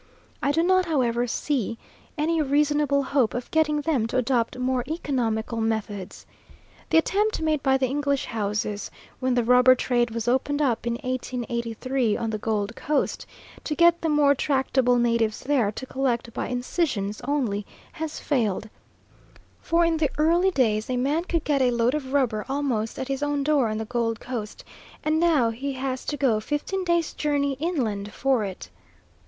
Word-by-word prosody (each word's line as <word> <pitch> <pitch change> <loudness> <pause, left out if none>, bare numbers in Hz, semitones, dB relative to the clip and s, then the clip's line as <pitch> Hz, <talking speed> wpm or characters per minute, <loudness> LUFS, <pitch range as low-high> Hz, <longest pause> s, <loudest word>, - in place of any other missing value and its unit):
I 280 - +2
do 325 +3 +2
not, 370 +1 +3
however, 245 -6 +1
see 235 -3 -1 0.4
any 320 +2 +1
reasonable 290 0 +2
hope 260 -4 +1
of 245 0 -5
getting 305 -2 +2
them 280 -8 0
to 245 - -2
adopt 245 -1 0
more 255 0 0
economical 235 -7 -2
methods. 215 -3 -3 0.6
The - - +4
attempt 415 +6 +2
made 310 -2 0
by 265 -1 +3
the 265 - +1
English 280 +1 0
houses, 210 -1 -2 0.3
when 255 -1 +1
the 245 - +2
rubber 250 +2 +6
trade 240 -1 +1
was 230 0 -4
opened 265 +4 +1
up 245 -5 0
in 235 - +1
1883 245 -2 -2
on 225 -1 -2
the 215 - -3
Gold 215 0 -2
Coast, 295 -1 -1 0.4
to 300 - -2
get 340 +1 +4
the 325 - 0
more 295 -2 +4
tractable 265 -3 +1
natives 230 -2 +1
there 255 -7 +1
to 260 - -6
collect 245 -3 -2
by - - -3
incisions 245 - -2
only, 245 -8 0 0.3
has 315 -1 -5
failed; 220 -6 -1 0.9
for 335 +1 +2
in 330 -1 +1
the 310 -2 +1
early 340 +5 +3
days 220 - +1
a 255 - 0
man 290 +7 0
could 335 -3 -1
get 285 -2 +1
a 255 - +4
load 235 +1 +1
of 275 -4 -3
rubber 245 -7 +1
almost 265 -6 -1
at 260 - -4
his 275 0 -3
own 290 -1 0
door 280 -5 +2
on 215 - -2
the 220 - -3
Gold 230 -1 -1
Coast, 235 -4 -6 0.4
and 310 +1 +1
now 305 -9 +3
he 275 +5 -4
has 260 0 -3
to 290 - -2
go 245 -7 +2
fifteen 295 - -2
days' 340 -2 +1
journey 285 -2 0
inland 230 - -2
for 260 -1 +1
it. 190 -2 -6
260 Hz, 170 wpm, -25 LUFS, 230-295 Hz, 0.9 s, rubber